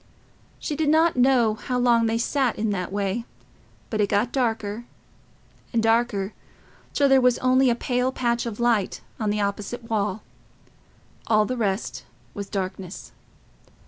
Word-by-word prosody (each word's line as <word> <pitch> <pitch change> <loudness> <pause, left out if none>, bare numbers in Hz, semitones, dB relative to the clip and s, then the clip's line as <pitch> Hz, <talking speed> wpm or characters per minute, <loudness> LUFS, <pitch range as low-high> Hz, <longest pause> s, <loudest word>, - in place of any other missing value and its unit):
She 300 - -4
did 305 0 +1
not 320 +2 +4
know 250 -3 +4
how 250 +3 -3
long 235 -2 +3
they 225 +1 +1
sat 255 +1 0
in 215 0 0
that 185 -2 -3
way, 200 +3 -1 0.7
but 215 -2 0
it 205 - +1
got 215 +4 +1
darker 225 -3 -1 0.9
and 230 -2 +1
darker, 225 -3 +1 0.6
till 285 - +3
there 270 -1 +5
was 250 -1 +4
only 255 +1 +3
a 235 - +2
pale 250 +1 0
patch 240 -2 -1
of 225 -1 -6
light 235 -5 +1 0.2
on 215 -2 0
the 210 0 0
opposite 210 +4 -4
wall: 210 -1 -1 1.0
all 215 -1 +4
the 255 - -2
rest 205 -4 -2 0.3
was 200 -1 -6
darkness. 190 -1 -5
230 Hz, 150 wpm, -24 LUFS, 205-250 Hz, 1.0 s, there